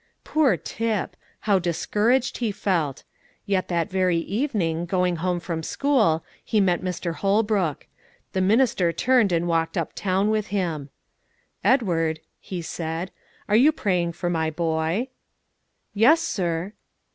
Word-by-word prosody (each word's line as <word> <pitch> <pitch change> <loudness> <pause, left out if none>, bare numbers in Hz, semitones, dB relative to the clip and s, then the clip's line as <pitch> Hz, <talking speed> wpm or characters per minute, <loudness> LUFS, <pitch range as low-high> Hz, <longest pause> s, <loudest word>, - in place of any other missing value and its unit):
Poor 280 - +2
Tip! 215 +6 -3 0.3
how 200 -3 +3
discouraged 215 +8 0
he 230 -4 0
felt! 170 -9 -1 0.4
Yet 195 -3 0
that 175 +2 -1
very 185 -2 +2
evening, 175 - -1
going 180 -1 +1
home 180 +1 -1
from 170 -2 -4
school, 215 - +1 0.2
he 215 - +1
met 180 -3 +2
Mr. 180 -2 -3
Holbrook; 200 -4 0 0.5
the 190 - 0
minister 200 -3 +3
turned 230 +3 +3
and 170 0 +1
walked 165 +2 0
up 165 - -2
town 195 +2 0
with 215 -1 0
him. 165 -8 -2 0.7
"Edward," 165 - +2 0.2
he 180 -3 -6
said, 165 +2 -4 0.4
"are 210 - +2
you 270 +8 +6
praying 180 - 0
for 175 +1 -4
my 160 -2 0
boy?" 165 +8 -1 0.8
"Yes, 245 +11 +5
sir." 180 - -2
185 Hz, 135 wpm, -24 LUFS, 165-215 Hz, 0.8 s, you